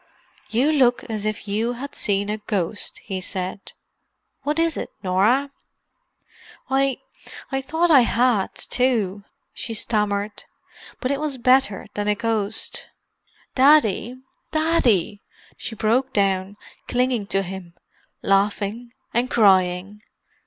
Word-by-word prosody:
"You 255 Hz, +7 st, +2 dB
look 255 Hz, -5 st, +3 dB
as 215 Hz, -1 st, -2 dB
if 215 Hz, 0 st, -4 dB
you 220 Hz, +4 st, 0 dB
had 275 Hz, +4 st, -7 dB
seen 200 Hz, 0 st, 0 dB
a 215 Hz, -, -3 dB
ghost," 205 Hz, -1 st, -2 dB
he 190 Hz, -1 st, -4 dB
said. 185 Hz, +1 st, -5 dB, 0.7 s
"What 295 Hz, +2 st, -1 dB
is 330 Hz, -1 st, +2 dB
it, -, -, -4 dB
Norah?" 215 Hz, +10 st, +2 dB, 1.2 s
"I—I 270 Hz, 0 st, -3 dB
thought 325 Hz, +5 st, +1 dB
I 285 Hz, -, +8 dB
had, 235 Hz, -4 st, +2 dB
too," 215 Hz, -6 st, 0 dB, 0.3 s
she 225 Hz, -, -5 dB
stammered. 210 Hz, -1 st, 0 dB, 0.6 s
"But 255 Hz, -, 0 dB
it 280 Hz, -, -1 dB
was 300 Hz, -3 st, -2 dB
better 255 Hz, -4 st, +3 dB
than 205 Hz, 0 st, -3 dB
a 210 Hz, -, +2 dB
ghost. 220 Hz, -1 st, -2 dB, 0.7 s
Daddy—Daddy!" 255 Hz, -, +2 dB, 0.3 s
she 225 Hz, -, -7 dB
broke 245 Hz, +5 st, +1 dB
down, 195 Hz, 0 st, 0 dB, 0.3 s
clinging 250 Hz, -4 st, 0 dB
to 195 Hz, -1 st, +1 dB
him, 180 Hz, -2 st, -8 dB, 0.5 s
laughing 205 Hz, +4 st, 0 dB, 0.2 s
and 245 Hz, +2 st, +1 dB
crying. 190 Hz, -1 st, +3 dB
220 Hz, 115 wpm, -22 LUFS, 200-260 Hz, 1.2 s, I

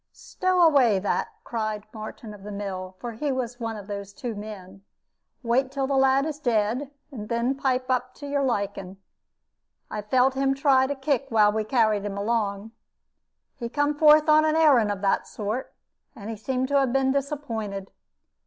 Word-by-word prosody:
"Stow 370 Hz, -1 st, 0 dB
away 270 Hz, -, +5 dB
that," 195 Hz, +2 st, -1 dB, 0.2 s
cried 215 Hz, -2 st, -3 dB
Martin 215 Hz, 0 st, -8 dB
of 205 Hz, -, -13 dB
the 210 Hz, +1 st, -8 dB
mill, 190 Hz, -2 st, -5 dB
for 240 Hz, +4 st, -6 dB
he 275 Hz, +6 st, -2 dB
was 250 Hz, -2 st, -3 dB
one 225 Hz, -1 st, -3 dB
of 205 Hz, -, -9 dB
those 200 Hz, -1 st, -6 dB
two 245 Hz, -3 st, -5 dB
men; 195 Hz, -2 st, -9 dB, 0.6 s
"wait 255 Hz, +3 st, +1 dB
till 275 Hz, -1 st, -1 dB
the 275 Hz, -, -1 dB
lad 270 Hz, +1 st, +3 dB
is 305 Hz, -2 st, -4 dB
dead, 240 Hz, +1 st, 0 dB, 0.2 s
and 210 Hz, -6 st, -8 dB
then 235 Hz, +3 st, +1 dB
pipe 260 Hz, -2 st, 0 dB
up 255 Hz, 0 st, -1 dB
to 285 Hz, -, -9 dB
your 285 Hz, 0 st, -1 dB
liking. 200 Hz, -6 st, -2 dB, 0.9 s
I 210 Hz, -, -3 dB
felt 255 Hz, +5 st, +2 dB
him 270 Hz, 0 st, +1 dB
try 270 Hz, -1 st, +3 dB
to 285 Hz, -, -2 dB
kick 275 Hz, 0 st, -1 dB
while 215 Hz, -2 st, +4 dB
we 215 Hz, +1 st, -1 dB
carried 215 Hz, -3 st, +2 dB
him 200 Hz, -1 st, -4 dB
along. 205 Hz, -1 st, -1 dB, 0.8 s
He 235 Hz, -3 st, -5 dB
come 290 Hz, +3 st, +1 dB
forth 305 Hz, +1 st, +6 dB
on 310 Hz, 0 st, +6 dB
a 310 Hz, -, +3 dB
arrand 275 Hz, -10 st, +5 dB
of 200 Hz, -2 st, -4 dB
that 195 Hz, -1 st, +1 dB
sort, 215 Hz, +5 st, -4 dB, 0.4 s
and 215 Hz, +1 st, -7 dB
he -, -, -4 dB
seem 255 Hz, +4 st, -2 dB
to 280 Hz, +1 st, +2 dB
'a 270 Hz, -, +2 dB
been 265 Hz, +1 st, +1 dB
disappointed. 230 Hz, -9 st, -3 dB
240 Hz, 180 wpm, -25 LUFS, 210-275 Hz, 0.9 s, forth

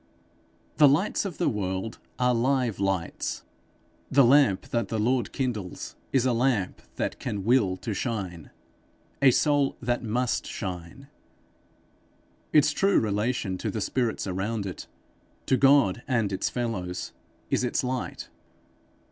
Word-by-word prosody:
The 150 Hz, -, +8 dB
lights 160 Hz, +10 st, +2 dB
of 185 Hz, -5 st, -5 dB
the -, -, +1 dB
world 95 Hz, 0 st, -2 dB, 0.2 s
are 125 Hz, 0 st, +2 dB
live 125 Hz, -2 st, +1 dB
lights. 95 Hz, -3 st, -2 dB, 0.7 s
The 140 Hz, +1 st, +5 dB
lamp 125 Hz, -7 st, +4 dB
that 115 Hz, -4 st, 0 dB
the 110 Hz, -, -2 dB
Lord 120 Hz, +3 st, +1 dB
kindles 115 Hz, -9 st, -4 dB, 0.2 s
is 130 Hz, -2 st, +2 dB
a 125 Hz, -, +2 dB
lamp 115 Hz, -6 st, 0 dB
that -, -, -3 dB
can 100 Hz, -2 st, -3 dB
will 105 Hz, -5 st, +3 dB
to 110 Hz, +3 st, -4 dB
shine, 95 Hz, -, -4 dB, 0.7 s
a 135 Hz, -, +7 dB
soul 145 Hz, +1 st, +2 dB
that 120 Hz, 0 st, -1 dB
must 120 Hz, +2 st, -1 dB
shine. 90 Hz, +7 st, -6 dB, 1.4 s
Its 150 Hz, -1 st, +5 dB
true 195 Hz, +6 st, +3 dB
relation 105 Hz, -2 st, -1 dB
to 110 Hz, -, -2 dB
the 110 Hz, -, -3 dB
spirits 120 Hz, +2 st, -1 dB
around 100 Hz, +3 st, -2 dB
it 95 Hz, -, -7 dB, 0.6 s
to 130 Hz, -, +3 dB
God 135 Hz, -6 st, +4 dB
and 115 Hz, -7 st, +1 dB
its 95 Hz, -, -1 dB
fellows, 100 Hz, -8 st, -3 dB, 0.4 s
is -, -, +2 dB
its 125 Hz, -, 0 dB
light. 125 Hz, 0 st, -3 dB
115 Hz, 135 wpm, -27 LUFS, 100-130 Hz, 1.4 s, The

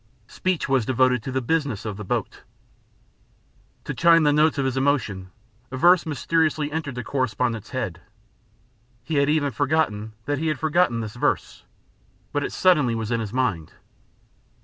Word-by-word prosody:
Speech 185 Hz, +9 st, -2 dB
was 135 Hz, -3 st, +2 dB
devoted 125 Hz, +1 st, +2 dB
to 130 Hz, -, -6 dB
the 130 Hz, 0 st, -2 dB
business 130 Hz, -6 st, -1 dB
of 105 Hz, -2 st, -4 dB
the 105 Hz, -, -7 dB
boat. 95 Hz, -, -3 dB, 1.4 s
To -, -, -4 dB
chime 165 Hz, -1 st, +5 dB
the 145 Hz, -1 st, +4 dB
notes 155 Hz, +1 st, +3 dB
of 135 Hz, -, 0 dB
his 130 Hz, -1 st, -1 dB
emotion, 125 Hz, -9 st, 0 dB, 0.4 s
a 130 Hz, -, -6 dB
verse 175 Hz, +3 st, +5 dB
mysteriously 155 Hz, 0 st, 0 dB
entered 150 Hz, -4 st, -4 dB
the 125 Hz, -, -4 dB
correspondent's 120 Hz, -4 st, -2 dB
head. 110 Hz, -10 st, -4 dB, 1.0 s
He 155 Hz, +1 st, -2 dB
had 140 Hz, 0 st, +3 dB
even 150 Hz, -2 st, +1 dB
forgotten 115 Hz, -6 st, -1 dB
that 145 Hz, -1 st, -1 dB
he 160 Hz, -, -1 dB
had 155 Hz, -3 st, 0 dB
forgotten 155 Hz, -5 st, +1 dB
this 105 Hz, -1 st, -6 dB
verse, 120 Hz, -, -2 dB, 0.7 s
but 145 Hz, -1 st, -1 dB
it -, -, -3 dB
suddenly 150 Hz, -11 st, +3 dB
was 110 Hz, 0 st, -4 dB
in 115 Hz, -, +1 dB
his 110 Hz, -3 st, -4 dB
mind. 105 Hz, -11 st, -1 dB
130 Hz, 165 wpm, -23 LUFS, 115-155 Hz, 1.4 s, chime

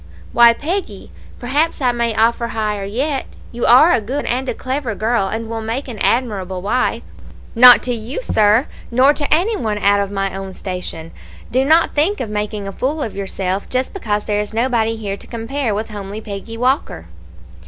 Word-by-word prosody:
"'Why, 235 Hz, 0 st, +7 dB
Peggy, 350 Hz, +10 st, -4 dB, 0.3 s
perhaps 290 Hz, +7 st, 0 dB
I 255 Hz, -3 st, +2 dB
may 235 Hz, -2 st, -1 dB
offer 235 Hz, +1 st, +2 dB
higher 210 Hz, -3 st, -2 dB
yet; 265 Hz, +7 st, -2 dB, 0.2 s
you 240 Hz, 0 st, -2 dB
are 260 Hz, +8 st, +7 dB
a 235 Hz, -, +2 dB
good 260 Hz, +7 st, -3 dB
and 255 Hz, +2 st, -1 dB
a -, -, -2 dB
clever 260 Hz, -3 st, -3 dB
girl, 220 Hz, -2 st, 0 dB
and 225 Hz, +3 st, -4 dB
will 225 Hz, 0 st, -4 dB
make 230 Hz, +6 st, -4 dB
an 230 Hz, -5 st, -7 dB
admirable 200 Hz, -7 st, 0 dB
wife.' 245 Hz, +5 st, 0 dB, 0.5 s
"'Not 245 Hz, +1 st, +8 dB
to 250 Hz, -, -1 dB
you, 235 Hz, -, -5 dB
sir; 215 Hz, -, +3 dB, 0.2 s
nor 260 Hz, +4 st, +4 dB
to 290 Hz, -1 st, -3 dB
any 370 Hz, +9 st, +3 dB
one 215 Hz, -, -2 dB
out 205 Hz, 0 st, +3 dB
of 200 Hz, -1 st, -1 dB
my 195 Hz, -1 st, -2 dB
own 195 Hz, 0 st, -6 dB
station. 180 Hz, -3 st, -6 dB, 0.4 s
Do 260 Hz, +2 st, +2 dB
not 320 Hz, +4 st, +3 dB
think 345 Hz, +8 st, +1 dB
of 220 Hz, -, -4 dB
making 210 Hz, -1 st, -3 dB
a -, -, -4 dB
fool 285 Hz, +8 st, -2 dB
of 220 Hz, -, -5 dB
yourself, 195 Hz, 0 st, -3 dB
just 255 Hz, +1 st, -2 dB
because 210 Hz, -, -2 dB
there 210 Hz, -1 st, 0 dB
is 210 Hz, +1 st, -6 dB
nobody 230 Hz, -2 st, +1 dB
here 200 Hz, -3 st, -4 dB
to -, -, -13 dB
compare 235 Hz, 0 st, -3 dB
with 220 Hz, +2 st, -3 dB
homely 205 Hz, 0 st, -6 dB
Peggy 215 Hz, +2 st, -7 dB
Walker.' 250 Hz, -, 0 dB
230 Hz, 190 wpm, -18 LUFS, 205-260 Hz, 0.5 s, Not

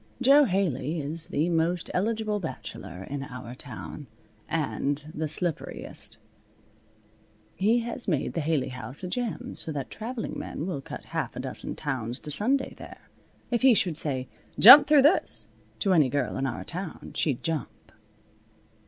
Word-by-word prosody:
Jo 275 Hz, +3 st, +6 dB
Haley 175 Hz, -, 0 dB
is 155 Hz, +3 st, -3 dB
the 155 Hz, +4 st, 0 dB
most 170 Hz, +1 st, 0 dB
eligible 215 Hz, +1 st, 0 dB
bachelor 125 Hz, -, -7 dB
in 140 Hz, +6 st, -5 dB
our 125 Hz, -2 st, -8 dB
town, 135 Hz, +2 st, -8 dB, 0.4 s
and 150 Hz, -1 st, -2 dB
the 155 Hz, 0 st, -2 dB
slipperiest. 165 Hz, +1 st, -4 dB, 1.4 s
He 225 Hz, +5 st, +3 dB
has 235 Hz, +1 st, -4 dB
made 155 Hz, -7 st, 0 dB
the 165 Hz, -, -1 dB
Haley 150 Hz, -3 st, 0 dB
House 125 Hz, +4 st, -6 dB
a -, -, -2 dB
gem, 235 Hz, +4 st, -3 dB
so 160 Hz, -, -3 dB
that 140 Hz, -4 st, -5 dB
traveling 230 Hz, +1 st, -5 dB
men 155 Hz, -, -5 dB
will 175 Hz, -7 st, -3 dB
cut -, -, -9 dB
half -, -, -2 dB
a -, -, -5 dB
dozen -, -, -5 dB
towns 125 Hz, -3 st, -2 dB
to 150 Hz, -, 0 dB
Sunday 260 Hz, -, +1 dB
there. -, -, -12 dB, 0.4 s
If 240 Hz, -, +1 dB
he 260 Hz, -3 st, +7 dB
should 180 Hz, -6 st, +1 dB
say 135 Hz, -5 st, -2 dB, 0.3 s
"Jump 255 Hz, +7 st, +11 dB
through 295 Hz, -3 st, +6 dB
this!" 300 Hz, +6 st, +2 dB, 0.3 s
to 195 Hz, -3 st, +2 dB
any 150 Hz, -7 st, +4 dB
girl 135 Hz, 0 st, -1 dB
in 135 Hz, 0 st, -1 dB
our 120 Hz, -, -4 dB
town 175 Hz, -1 st, -5 dB
she'd 140 Hz, -6 st, -1 dB
jump. 135 Hz, -10 st, -4 dB
160 Hz, 155 wpm, -27 LUFS, 140-210 Hz, 1.4 s, Jump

